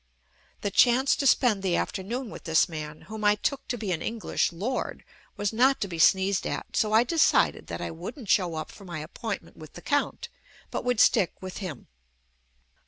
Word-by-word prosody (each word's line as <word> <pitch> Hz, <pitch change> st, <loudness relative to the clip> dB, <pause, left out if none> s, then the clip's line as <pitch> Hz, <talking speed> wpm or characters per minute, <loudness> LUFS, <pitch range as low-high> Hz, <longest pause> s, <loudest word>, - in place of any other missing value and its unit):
The 205 Hz, -, -2 dB
chance 250 Hz, +6 st, +4 dB
to 275 Hz, -, +1 dB
spend 240 Hz, -7 st, +3 dB
the 185 Hz, -3 st, +1 dB
after -, -, -2 dB
noon 235 Hz, +4 st, -4 dB
with -, -, -10 dB
this 160 Hz, 0 st, +3 dB
man, 155 Hz, -2 st, -7 dB
whom 215 Hz, +1 st, -8 dB
I 210 Hz, 0 st, +5 dB
took 275 Hz, +6 st, -2 dB
to 245 Hz, -, -2 dB
be 210 Hz, -4 st, -3 dB
an 165 Hz, -, -1 dB
Eng 230 Hz, -, -3 dB
lish -, -, +1 dB
Lord, 210 Hz, +10 st, -3 dB, 0.3 s
was 205 Hz, +1 st, -1 dB
not 260 Hz, +4 st, +4 dB
to 200 Hz, -, 0 dB
be 170 Hz, -3 st, -6 dB
sneezed 190 Hz, +3 st, +3 dB
at, -, -, -5 dB
so 215 Hz, -1 st, +2 dB
I 220 Hz, +2 st, +5 dB
de 325 Hz, +7 st, -2 dB
cided -, -, +3 dB
that -, -, -5 dB
I -, -, -3 dB
wouldn't 205 Hz, -, -8 dB
show 180 Hz, -4 st, +2 dB
up 155 Hz, -1 st, -5 dB
for 200 Hz, -, -14 dB
my 175 Hz, -4 st, -6 dB
appoint 190 Hz, +8 st, -5 dB
ment -, -, -19 dB
with 155 Hz, -1 st, -12 dB
the 175 Hz, -, -10 dB
Count, 290 Hz, +11 st, -1 dB, 0.4 s
but -, -, -3 dB
would 245 Hz, -2 st, 0 dB
stick 185 Hz, -, +3 dB
with 185 Hz, -1 st, -7 dB
him. 175 Hz, -, -6 dB
205 Hz, 215 wpm, -27 LUFS, 175-240 Hz, 0.4 s, I